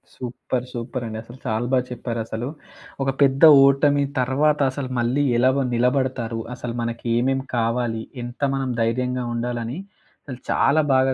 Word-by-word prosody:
Super 125 Hz, 0 st, -4 dB
సూపరండి 120 Hz, -2 st, -5 dB
అసలు. 120 Hz, +3 st, -13 dB
చాలా 115 Hz, +1 st, -1 dB
బా 130 Hz, -, +5 dB
చెప్పారసలు. 115 Hz, -1 st, -4 dB, 0.6 s
ఒక 135 Hz, -, 0 dB
పెద్ద 135 Hz, 0 st, +3 dB, 0.2 s
ఓటమి 140 Hz, +1 st, +3 dB, 0.2 s
తర్వాత 145 Hz, +4 st, +2 dB
అసలు 130 Hz, -1 st, -5 dB
మళ్ళీ 125 Hz, +5 st, +1 dB
ఎలా 130 Hz, +2 st, +4 dB
వ 140 Hz, -, +1 dB
నిలబడతారు? 125 Hz, -2 st, 0 dB
అసలు 120 Hz, -1 st, -5 dB
మనకి 115 Hz, 0 st, -4 dB
ఏమేమి 135 Hz, +2 st, 0 dB
కావాలి, 115 Hz, -1 st, 0 dB, 0.2 s
ఎంత 120 Hz, +2 st, -9 dB
మనం 135 Hz, -2 st, -2 dB
ధైర్యంగా 125 Hz, +2 st, 0 dB
ఉండాలని, 120 Hz, +2 st, -3 dB, 0.5 s
అసలు 130 Hz, -4 st, -8 dB
చాలా 155 Hz, +3 st, +3 dB
బాగా 130 Hz, 0 st, +3 dB
125 Hz, 140 wpm, -22 LUFS, 120-135 Hz, 0.6 s, బా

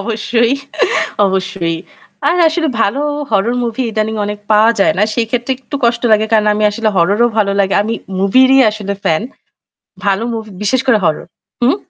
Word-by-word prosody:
অবশ্যই, 230 Hz, +3 st, 0 dB, 0.7 s
অবশ্যই। 190 Hz, -3 st, -2 dB, 0.5 s
আর -, -, +2 dB
আসলে 320 Hz, 0 st, -1 dB
ভালো 255 Hz, +8 st, 0 dB, 0.3 s
horror 215 Hz, +4 st, +1 dB
movie 235 Hz, +1 st, -2 dB
ইদানিং 220 Hz, 0 st, -2 dB
অনেক 210 Hz, 0 st, -5 dB
পাওয়া 215 Hz, +2 st, +5 dB
যায় 205 Hz, -, +3 dB
না। 205 Hz, -, +3 dB
সেই 235 Hz, -2 st, 0 dB
ক্ষেত্রে 245 Hz, +2 st, -1 dB
একটু 275 Hz, +2 st, -6 dB
কষ্ট 235 Hz, 0 st, +1 dB
লাগে। 215 Hz, 0 st, +3 dB
কারণ 215 Hz, -1 st, +3 dB
আমি 210 Hz, 0 st, 0 dB
আসলে 215 Hz, +1 st, -1 dB
horror 195 Hz, +6 st, +2 dB
ও -, -, +1 dB
ভালো 200 Hz, -2 st, +2 dB
লাগে। 195 Hz, 0 st, +1 dB
আমি 225 Hz, +2 st, -2 dB, 0.2 s
movie 200 Hz, +7 st, +4 dB
রই 270 Hz, 0 st, +6 dB
আসলে 210 Hz, -2 st, -5 dB
fan. 160 Hz, +2 st, +1 dB, 0.8 s
ভালো 200 Hz, +2 st, +1 dB
movie 220 Hz, -2 st, -6 dB
বিশেষ 255 Hz, +5 st, +1 dB
করে 245 Hz, -4 st, +5 dB
horror 155 Hz, -, -1 dB, 0.4 s
হুম? 250 Hz, +6 st, +3 dB
215 Hz, 175 wpm, -15 LUFS, 200-235 Hz, 0.8 s, রই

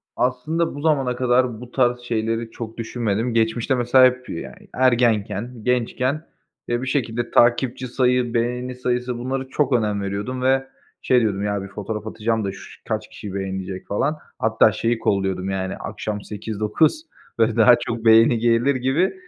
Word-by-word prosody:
Aslında 140 Hz, +7 st, -1 dB
bu 145 Hz, -, -6 dB
zamana 135 Hz, -6 st, +1 dB
kadar 125 Hz, -2 st, +1 dB
bu 125 Hz, 0 st, -10 dB
tarz 125 Hz, -2 st, +2 dB
şeyleri 115 Hz, -1 st, -2 dB
çok 115 Hz, -1 st, -8 dB
düşünmedim. 115 Hz, 0 st, -2 dB
Geçmişte 115 Hz, +3 st, +1 dB
mesela 125 Hz, +1 st, +5 dB
hep 125 Hz, 0 st, 0 dB
yani, 85 Hz, -, -8 dB
ergenken, 120 Hz, -2 st, +1 dB
gençken, 125 Hz, +5 st, 0 dB, 0.4 s
eee, 120 Hz, +1 st, -1 dB
bir 130 Hz, -, -4 dB
şekilde 120 Hz, -3 st, -1 dB
takipçi 125 Hz, +2 st, +2 dB
sayı, 125 Hz, -1 st, +1 dB
beğeni 125 Hz, +2 st, -1 dB
sayısı, 125 Hz, 0 st, -2 dB
bunlara 130 Hz, +2 st, -3 dB
çok 140 Hz, 0 st, 0 dB
önem 105 Hz, -4 st, +1 dB
veriyordum 100 Hz, +6 st, -3 dB
ve 135 Hz, +1 st, +2 dB, 0.3 s
şey 125 Hz, -1 st, +3 dB
diyordum, 100 Hz, -3 st, 0 dB
ya 100 Hz, -1 st, -1 dB
bir -, -, -7 dB
fotoğraf 105 Hz, +2 st, -6 dB
atacağım 110 Hz, 0 st, -1 dB
da 100 Hz, -, -2 dB
şu -, -, -13 dB
kaç -, -, -2 dB
kişi 100 Hz, -3 st, -8 dB
beğenecek 95 Hz, -1 st, -5 dB
falan. 145 Hz, +9 st, 0 dB, 0.2 s
Hatta -, -, +4 dB
şeyi 115 Hz, 0 st, -1 dB
kolluyordum 95 Hz, -3 st, 0 dB
yani 95 Hz, 0 st, -2 dB
akşam 105 Hz, -1 st, -5 dB
8-9, 110 Hz, -, 0 dB, 0.4 s
böyle 110 Hz, -1 st, +3 dB
daha 120 Hz, +1 st, +7 dB
çok 115 Hz, -1 st, -4 dB
beğeni 115 Hz, +1 st, +6 dB
gelir 120 Hz, +4 st, +2 dB
gibi 135 Hz, +8 st, +1 dB
120 Hz, 160 wpm, -22 LUFS, 110-125 Hz, 0.4 s, daha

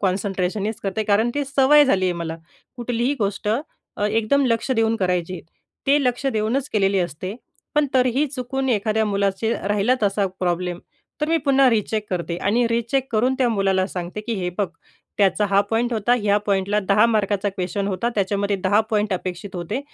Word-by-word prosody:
कॉन्सन्ट्रेशनच 195 Hz, +2 st, -1 dB
करते, 200 Hz, +2 st, -1 dB
कारण 215 Hz, +3 st, +2 dB
ती 290 Hz, 0 st, 0 dB
सवय 280 Hz, +2 st, +5 dB
झाली 195 Hz, -9 st, +2 dB
आहे 180 Hz, -, +2 dB
मला. 165 Hz, -1 st, -5 dB, 0.4 s
कुठलीही 245 Hz, +2 st, -1 dB
गोष्ट 200 Hz, -1 st, -2 dB, 0.5 s
अ, 205 Hz, -, 0 dB
एकदम 225 Hz, +6 st, +2 dB
लक्ष 230 Hz, +2 st, 0 dB
देऊन 225 Hz, 0 st, +2 dB
करायची, 180 Hz, -1 st, -1 dB, 0.5 s
ते 285 Hz, +1 st, +4 dB
लक्ष 250 Hz, +2 st, 0 dB
देऊनच 250 Hz, +3 st, 0 dB
केलेली 195 Hz, -4 st, +1 dB
असते. 180 Hz, +2 st, -3 dB, 0.4 s
पण 300 Hz, -1 st, +3 dB
तरीही 255 Hz, +3 st, +3 dB
चुकून 265 Hz, -1 st, -3 dB
एखाद्या 220 Hz, -1 st, +1 dB
मुलाचं 200 Hz, +2 st, 0 dB, 0.2 s
राहिला 205 Hz, +4 st, +2 dB
तसा 200 Hz, 0 st, +1 dB
प्रॉब्लेम, 175 Hz, -1 st, -1 dB, 0.4 s
तर 300 Hz, -, 0 dB
मी 330 Hz, -, +3 dB
पुन्हा 275 Hz, -2 st, +5 dB
रिचेक 215 Hz, -1 st, -1 dB
करते 170 Hz, -2 st, -2 dB
आणि 225 Hz, +7 st, +1 dB
रिचेक 235 Hz, +3 st, 0 dB
करून 245 Hz, +4 st, +2 dB
त्या 255 Hz, -2 st, +3 dB
मुलाला 195 Hz, -4 st, +1 dB
सांगते 180 Hz, +1 st, -5 dB
की 235 Hz, -, -1 dB
"हे 185 Hz, -3 st, -2 dB
बघ, 205 Hz, -, +2 dB, 0.5 s
त्याचा 200 Hz, 0 st, +3 dB
हा 200 Hz, 0 st, +5 dB
पॉइंट 235 Hz, +2 st, +1 dB
होता, 230 Hz, +2 st, +2 dB
ह्या 205 Hz, -2 st, +2 dB
पॉइंटला 200 Hz, +1 st, +1 dB
10 205 Hz, +2 st, +5 dB
मार्काचा 205 Hz, -3 st, 0 dB
क्वेश्चन 195 Hz, +1 st, -3 dB
होता, 200 Hz, +5 st, -1 dB
त्याच्यामध्ये 200 Hz, 0 st, 0 dB
10 200 Hz, +3 st, +4 dB
पॉइंट 210 Hz, -1 st, +1 dB
अपेक्षित 185 Hz, +1 st, -6 dB
होते. 180 Hz, +9 st, -3 dB
210 Hz, 170 wpm, -22 LUFS, 195-240 Hz, 0.5 s, सवय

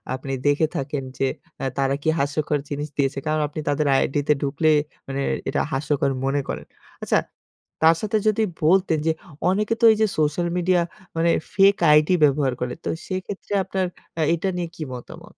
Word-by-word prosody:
আপনি 135 Hz, +1 st, -5 dB
দেখে 145 Hz, +2 st, +3 dB
থাকেন 140 Hz, 0 st, -3 dB
যে, 135 Hz, -, +1 dB, 0.3 s
অ্যাঁ 135 Hz, -2 st, -3 dB
তারা 135 Hz, 0 st, +1 dB
কি 160 Hz, -, +2 dB
হাস্যকর 145 Hz, +1 st, 0 dB
জিনিস 145 Hz, +1 st, -3 dB
দিয়েছে। 135 Hz, 0 st, +1 dB
কারণ 155 Hz, 0 st, +1 dB
আপনি 150 Hz, -, -7 dB
তাদের 145 Hz, +1 st, +1 dB
আইডিতে 145 Hz, +2 st, +2 dB
ঢুকলে 145 Hz, +3 st, +1 dB, 0.4 s
মানে 135 Hz, 0 st, -3 dB, 0.3 s
এটা -, -, 0 dB
হাস্যকর 140 Hz, 0 st, 0 dB
মনে 140 Hz, +1 st, +1 dB
করেন। -, -, -5 dB, 0.4 s
আচ্ছা -, -, +3 dB, 0.6 s
তার 165 Hz, +1 st, +7 dB
সাথে 215 Hz, 0 st, 0 dB
যদি 215 Hz, +1 st, +3 dB, 0.2 s
বলতেন 175 Hz, -2 st, +3 dB
যে -, -, +5 dB, 0.4 s
অনেকে 210 Hz, +4 st, +1 dB
তো -, -, +6 dB
এই -, -, -3 dB
যে 215 Hz, -, +5 dB
সোশ্যাল 155 Hz, +3 st, +1 dB
মিডিয়া 180 Hz, 0 st, +3 dB, 0.4 s
মানে 170 Hz, +1 st, +3 dB, 0.2 s
ফেক 195 Hz, 0 st, +6 dB, 0.2 s
আইডি 150 Hz, +4 st, +5 dB
ব্যবহার 140 Hz, -2 st, +3 dB
করে। 125 Hz, 0 st, -2 dB
তো -, -, -1 dB, 0.2 s
সেক্ষেত্রে 190 Hz, +2 st, -5 dB
আপনার 190 Hz, -1 st, -1 dB, 0.3 s
আ -, -, +2 dB
এইটা 180 Hz, +3 st, -1 dB
নিয়ে 175 Hz, -1 st, -2 dB
কি 155 Hz, -, -5 dB
মতামত? 120 Hz, -, -10 dB
150 Hz, 175 wpm, -23 LUFS, 140-180 Hz, 0.6 s, তার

